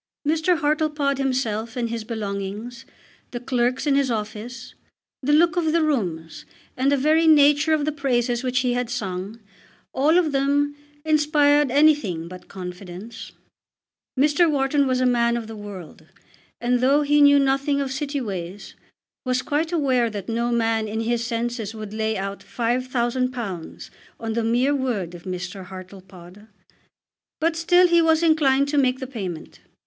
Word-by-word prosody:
Mr. 320 +3 +2
Hartlepod 300 -2 0
himself 235 -4 -2
and 235 -2 -2
his 230 -1 -4
belongings, 215 +1 -5 0.4
the 240 - -5
clerks 245 +1 -1
in 290 - +2
his 275 -1 +2
office, 225 +2 -5 0.5
the 280 +2 0
look 320 +2 +4
of 320 -2 +1
the 335 -1 +3
rooms, 175 - -2 0.3
and 265 +2 +1
the 285 - +3
very 310 +4 +3
nature 295 0 +5
of 305 -2 +2
the 305 - 0
praises 245 -4 -1
which 255 0 0
he 250 -1 0
had 245 -1 -2
sung, 200 -2 -4 0.5
all 300 +6 +3
of 335 -4 +2
them 285 +1 +1 0.3
inspired 295 -2 +3
anything 260 - +2
but 180 +1 -11
confidence. 185 +4 -9 0.9
Mr. 300 +4 +4
Wharton 280 -1 +1
was 255 -1 +1
a - - +2
man 235 -1 +2
of 235 - -5
the 225 0 -9
world; 200 -6 -10 0.5
and, 245 +1 +1
though 275 +4 +3
he 295 +1 +3
knew 285 0 +7
nothing 275 +1 +1
of 275 -2 -2
City 285 +1 -3
ways, 195 -4 -6 0.5
was 255 0 -1
quite 315 +3 -1
aware 260 -8 +1
that 205 -3 -7
no 235 +1 -1
man 225 -2 +1
in 220 +2 -3
his 235 +1 -1
senses 230 -2 -3
would 215 -1 -7
lay 220 0 -1
out 195 +1 -4
£5000 240 -5 -3 0.3
on 225 -1 -3
the 230 0 -1
mere 245 +5 +2
word 235 -11 -2
of 175 +1 -11
Mr. 180 +1 -6
Hartlepod. 185 +1 -12 0.9
But 330 +1 +1
still 355 +2 +4
he 340 -1 +4
was 320 0 +3
inclined 280 -4 +3
to 290 0 +2
make 255 -1 +2
the 260 - -4
payment. 195 -11 -7
250 Hz, 160 wpm, -23 LUFS, 220-290 Hz, 0.9 s, knew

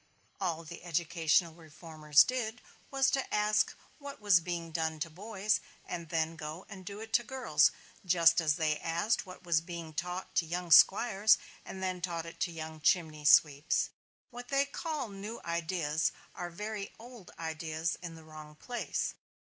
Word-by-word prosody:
All 170 -4 -2
the 170 +2 -10
educational 170 -1 +1
reformers 155 -2 +2
did 245 -2 -3 0.3
was 270 -1 +2
to 270 - -1
ask 210 +1 +2 0.2
what 280 -1 -8
was 205 -4 +5
being 170 -1 -4
done 160 -1 -2
to 165 0 -2
boys 205 +4 -1 0.3
and 170 -2 -6
then 165 -1 0
go 160 +2 -7
and 190 -1 -10
do 200 +2 -7
it 225 0 -10
to 240 - +4
girls; 265 +2 +3 0.3
just 170 -2 +5
as 155 -2 +2
they 155 -1 0
asked 170 +6 0
what 185 0 -11
was 170 -2 +2
being 170 -2 -7
taught 180 +4 -4
to 170 - +3
young 175 +1 -4
squires 210 +4 +6 0.3
and 190 0 -7
then 185 -1 -2
taught 170 -2 -3
it 165 - -10
to 175 - 0
young 160 -1 -7
chimney 155 -2 +1
sweeps. 145 0 +4 0.4
What 245 0 -9
they 275 +1 +2
call 305 -4 -4
new 205 +3 -7
ideas 170 -2 0 0.2
are 175 - -5
very 205 +3 -5
old 235 -4 -12
ideas 160 0 -3
in 170 -2 -7
the 160 - -13
wrong 155 -1 -11
place. 240 +10 -3
170 Hz, 165 wpm, -32 LUFS, 160-205 Hz, 0.4 s, squires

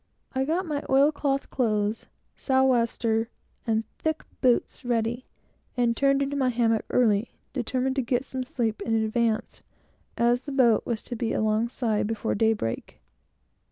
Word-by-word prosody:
I 265 0 0
got 340 +6 0
my 295 -3 -2
oil 275 +3 +5
cloth 275 -2 -2
clothes, 215 -3 0 0.3
south 265 -1 +2
wester, 230 -2 +1 0.4
and 220 0 +1 0.2
thick 315 0 -1 0.2
boots 250 -2 +1
all 245 - -7
ready, 235 +1 -1 0.5
and 240 -1 +2
turned 275 +2 +3
into 280 +1 -3
my 265 -2 +2
hammock 230 -2 +1
early, 220 -2 +2 0.2
determined 260 +1 -1
to - - +3
get 245 +1 -1
some 260 -1 -4
sleep 240 -5 -2
in 225 - 0
advance, 220 0 0 0.6
as 240 +1 +3
the 280 +1 -7
boat 240 -5 +3
was 230 -3 -2
to 245 - -5
be 230 0 -2
alongside 220 0 0
before 225 0 -2
daybreak. 215 - -1
240 Hz, 155 wpm, -26 LUFS, 225-265 Hz, 0.6 s, oil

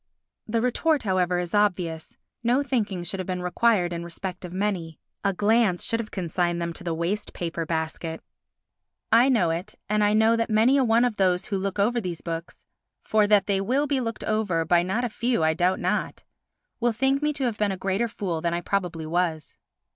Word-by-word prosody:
The 225 +1 0
retort, 280 +4 +1
however, 185 -3 +1
is 175 -1 -3
obvious; 180 -6 0 0.2
no 245 +4 +2
thinking 210 -10 -1
should 190 +3 -4
have 185 - -4
been 180 -1 -3
required 180 -1 +2
in 170 0 -4
respect 180 +2 -6
of 180 - -7
many—a 190 -1 -3
glance 210 -2 +2
should 230 -1 +1
have 220 -2 -4
consigned 175 -1 -1
them 170 0 -3
to 175 - -8
the 170 -2 -2
waste 175 +6 -2
paper 165 -1 -4
basket. 160 0 -3 0.9
I 235 +4 +6
know 200 -11 +3
it 175 +6 -5
and 210 0 +2
I 205 0 +3
know 220 +1 +4
that 230 0 -1
many 225 +5 +4
a 270 - +4
one 235 0 +4
of 240 -4 -1
those 180 -2 +2
who 205 - -3
look 195 0 -3
over 235 +4 +2
these 175 -5 -5
books—for 170 +5 -3
that 205 -1 +4
they 195 -1 +1
will 260 +9 +1
be 285 -2 0
looked 230 -3 -4
over 205 -7 0
by 170 +1 +4
not 190 +8 -1
a - - +1
few 235 -3 0
I 160 0 +3
doubt 180 +3 +1
not—will 240 - -4
think 270 +4 +1
me 300 0 +1
to 285 -2 -4
have 235 -4 -1
been 210 -1 +1
a 190 - -3
greater 195 +5 0
fool 185 -7 -3
than 170 0 0
I 175 - -2
probably 175 -4 -2
was. 160 -1 -1
195 Hz, 200 wpm, -25 LUFS, 175-230 Hz, 0.9 s, I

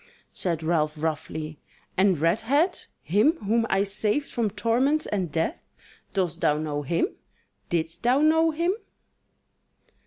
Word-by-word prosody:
Said 165 -3 -1
Ralph 155 -2 +1
roughly: 155 0 -4 0.4
"And 190 -2 +3
Redhead, 225 - +1 0.2
him 210 - +3
whom 225 +1 +1
I 195 +1 +3
saved 210 +7 0
from 230 -3 0
torments 245 +9 +1
and 185 -6 -2
death; 165 - -1 0.5
dost 185 -5 -1
thou 150 - +3
know 150 -1 -2
him? 165 - +1 0.6
didst 165 0 -1
thou 250 +3 +3
know 320 +2 +4
him?" 335 +4 +1
195 Hz, 125 wpm, -26 LUFS, 160-250 Hz, 0.6 s, know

